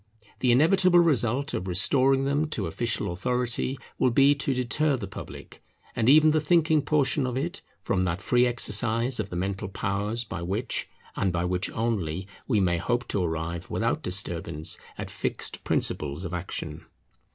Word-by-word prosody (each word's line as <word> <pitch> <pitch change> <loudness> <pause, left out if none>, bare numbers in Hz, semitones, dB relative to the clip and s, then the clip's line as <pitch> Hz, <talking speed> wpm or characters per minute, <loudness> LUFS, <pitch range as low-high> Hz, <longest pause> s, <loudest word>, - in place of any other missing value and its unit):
The 125 - +3
inevitable 175 +7 +4
result 140 -4 +2
of 90 - -3
restoring 135 +9 +3
them 145 +2 +1
to - - -2
official 115 -6 -1
authority 125 +6 -1 0.2
will 130 - +4
be 135 +4 +5
to 140 -1 -2
deter 130 +3 +1
the 105 - -5
public, 95 - -10 0.3
and 115 - +2
even 155 +2 +7
the 155 0 +2
thinking 160 0 +3
portion 145 -2 +1
of 125 0 -3
it, 170 +8 -3 0.2
from 90 - 0
that 90 -1 -1
free 125 +3 +3
exercise 120 +1 +1
of 100 -2 -2
the - - -6
mental 95 +3 -2
powers 105 +4 -2
by 85 -7 -6
which, 100 +8 -2 0.3
and 95 - 0
by 85 0 -1
which 90 +1 -1
only, 100 -6 -2 0.2
we 110 -6 +2
may 85 -3 +1
hope 120 +5 -1
to 100 - 0
arrive 80 0 -3
without - - -1
disturbance 85 -4 -1 0.2
at - - -6
fixed - - -4
principles 75 +4 -1
of 90 - -5
action. 90 +1 -5
120 Hz, 165 wpm, -26 LUFS, 95-135 Hz, 0.3 s, even